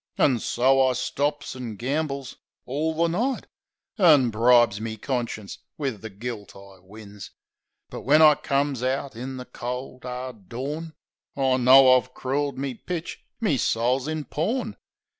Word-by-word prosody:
An' 130 -4 +3
so 130 +4 +3
I 130 - +1
stops 145 +4 -2
an' 120 -4 -6
gambles 140 +2 -3 0.3
orl 155 +5 -2
the 170 +1 +2
night; 235 +10 -1 0.5
An' 150 - +6
bribes 115 -2 +4
me 110 0 -4
conscience 115 -4 -4 0.2
wiv 135 -8 -3
the 110 - -7
gilt 105 0 -7
I 100 -1 -14
wins 105 +1 -11 0.6
But - - -6
when 145 +4 +4
I 155 -1 +8
comes 140 -2 -1
out 130 0 -2
in 130 +3 -6
the 125 - -7
cold, 125 +1 -6
'ard 125 -5 -7
dawn 150 +7 -5 0.4
I 130 -2 +2
know 130 +1 +7
I've 125 0 -1
crooled 140 +2 -2
me 135 -1 -3
pitch; 170 +6 -6 0.2
me 200 - +1
soul's 125 +4 0
in 155 -1 -3
pawn. 215 - -2
130 Hz, 150 wpm, -25 LUFS, 120-145 Hz, 0.6 s, I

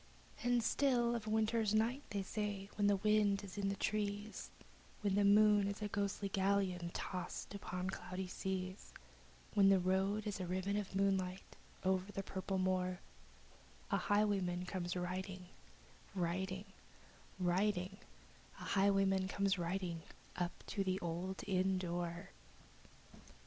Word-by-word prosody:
And 245 -1 +3
still 240 -1 +3
on 235 - -1
a 215 - -5
winter's 220 0 +2
night, 235 +5 +2
they 200 -1 -2
say, 205 0 -3
when 205 -1 +3
the 205 - +5
wind 205 0 +3
is 195 -2 -8
in 200 -1 0
the 200 - -1
trees, 205 +1 -2 0.5
When 200 -2 +1
the 205 +1 +4
moon 205 0 +6
is 200 0 -3
a - - 0
ghostly 200 0 -1
galleon 190 -3 +1
tossed 180 +2 -4
upon 185 -2 -3
cloudy 185 0 -4
seas, 185 +1 -4 0.6
When 200 -2 +6
the 195 - +7
road 190 +3 +1
is 205 -1 -2
a 185 - -2
gypsy's - - -7
ribbon 200 +3 0 0.9
looping 185 0 +1
the 195 - -2
purple 190 0 -3
moor, 185 -1 +1 0.9
The - - +4
highwayman 195 -4 +1
comes 180 -1 -3
riding 185 +1 -3 0.7
Riding 185 +2 -1 0.7
riding 185 +1 +1 0.6
The - - -8
highwayman 195 -1 +3
comes 195 0 +1
riding, 175 -1 -2 0.3
up 175 0 -3
to 200 - -1
the 185 0 0
old 175 +3 -3
inn 190 -1 +2
door. 175 0 -3
195 Hz, 135 wpm, -37 LUFS, 185-205 Hz, 0.9 s, the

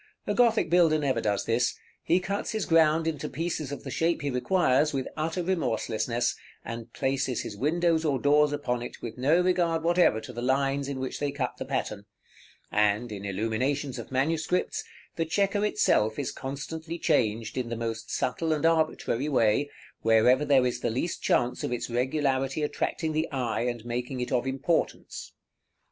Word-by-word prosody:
A - - 0
Gothic 235 -2 +3
builder 170 -2 +4
never 140 -3 0
does 105 -2 0
this: 120 +2 +1 0.3
he 175 - +2
cuts 200 +4 -3
his 215 -2 -1
ground 160 -1 +4
into 155 -4 -2
pieces 160 -2 -3
of 145 - -6
the - - -6
shape 165 -1 0
he 140 - -1
requires 150 +1 +2
with 135 -2 -2
utter 165 +3 -2
remorselessness, 120 -8 0 0.3
and 115 0 -6
places 135 -1 -1
his 105 - -6
windows 160 +6 +1
or 145 -4 +1
doors 145 +2 +4
upon 125 -5 -2
it 120 - -8
with 115 +1 -6
no 150 +7 +4
regard 175 -3 +1
whatever 170 -9 +3
to - - -9
the 120 - -5
lines 135 +2 +1
in 140 -2 -4
which 130 0 -4
they 145 -1 -1
cut 135 -3 -3
the - - -4
pattern: 100 -1 -3 0.7
and, 105 +3 +2
in 100 -1 -6
illuminations 120 +8 -1
of - - -9
manuscripts, 160 +6 0 0.3
the 165 - +2
chequer 200 +5 +1
itself 110 - +2
is 140 - -2
constantly 160 +5 -6
changed 110 -7 0
in 125 -2 -2
the 115 - -2
most 115 -1 -4
subtle 160 +5 0
and 155 +1 -1
arbitrary 155 -4 +1
way, 125 +1 +2 0.3
wherever 115 +5 +4
there 140 -3 +4
is 125 -1 -1
the - - -1
least 130 +10 -2
chance 125 0 +1
of - - -2
its 120 0 -3
regularity 135 +3 0
attracting 160 +2 -1
the 155 +1 -1
eye, 125 -5 -1
and 120 -2 -3
making 125 +2 -3
it 125 0 -3
of 125 0 +1
importance. 135 +5 -2
135 Hz, 175 wpm, -27 LUFS, 120-160 Hz, 0.7 s, builder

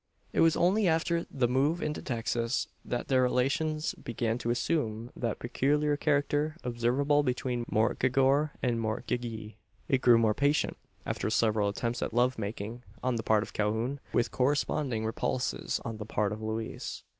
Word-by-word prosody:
It - - 0
was 165 -1 +5
only 190 +4 +3
after 170 +1 +1
the 130 -3 +1
move 140 +7 +2
into 150 -2 -3
Texas, 115 -1 -1 0.2
that 120 - -3
their 130 -1 +3
relations 145 +5 +1
began 115 0 -2
to 120 - -3
assume 120 -3 -1
that 115 -3 -2
peculiar 145 +4 +1
character 145 +1 +1
observable 125 +5 +2
between 125 -2 -1
mortgagor 130 +6 +3
and 120 -2 +1
mortgagee. 110 -1 -3 0.3
It 135 -5 +2
grew 120 -2 +7
more 110 -2 +3
patent, 145 +5 +1 0.3
after - - -2
several 110 -2 +2
attempts 115 +3 -2
at - - -3
love 125 0 +2
making 105 +3 -5 0.2
on 125 -2 +1
the - - -1
part 110 -1 +3
of - - -10
Calhoun, 110 +6 -1
with 120 0 +1
corresponding 130 -3 0
repulses 120 +3 -1
on 115 -2 -4
the 105 - -6
part 105 -2 0
of 105 +1 -5
Louise. 110 +1 -4
125 Hz, 155 wpm, -30 LUFS, 115-145 Hz, 0.3 s, grew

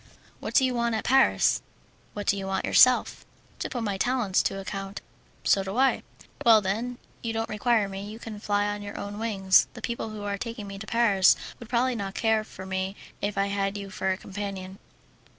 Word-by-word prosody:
"What - - -6
do 265 - +6
you 255 - 0
want 235 -1 0
at 220 - -2
Paris?" 265 +1 +4 0.5
"What 205 -1 -4
do - - +3
you 195 -1 -4
want 190 0 -1
yourself?" 255 -1 +5 0.4
"To - - -3
put 245 -4 -3
my 200 -3 -2
talents 245 -6 +2
to 195 - -2
account." 195 0 -5 0.4
"So 195 - +3
do 195 +4 -5
I." 265 +1 +3 0.4
"Well, 230 -4 +7
then, 220 +5 -2 0.2
you 230 -1 -3
don't 225 0 -2
require 215 0 +2
me, 195 +1 -6
and 225 - -10
can 220 -3 -8
fly 205 0 +1
on 205 0 -2
your 205 0 -7
own 205 +1 -6
wings. 195 -4 +3
The - - -9
people 235 -2 -3
who 215 -1 -7
are 200 -1 -3
taking 230 -2 -5
me 195 0 -8
to 215 - -8
Paris 205 -5 +5 0.2
would 235 - -11
probably 255 +1 +2
not 200 -3 -4
care 220 -1 +2
for 190 -3 -10
me 190 +1 -2 0.3
if 205 0 -2
I 195 - +3
had 200 0 -1
you 200 -1 -7
for 190 - -2
a 185 - -1
companion." 195 -1 -6
205 Hz, 210 wpm, -27 LUFS, 195-230 Hz, 0.5 s, Well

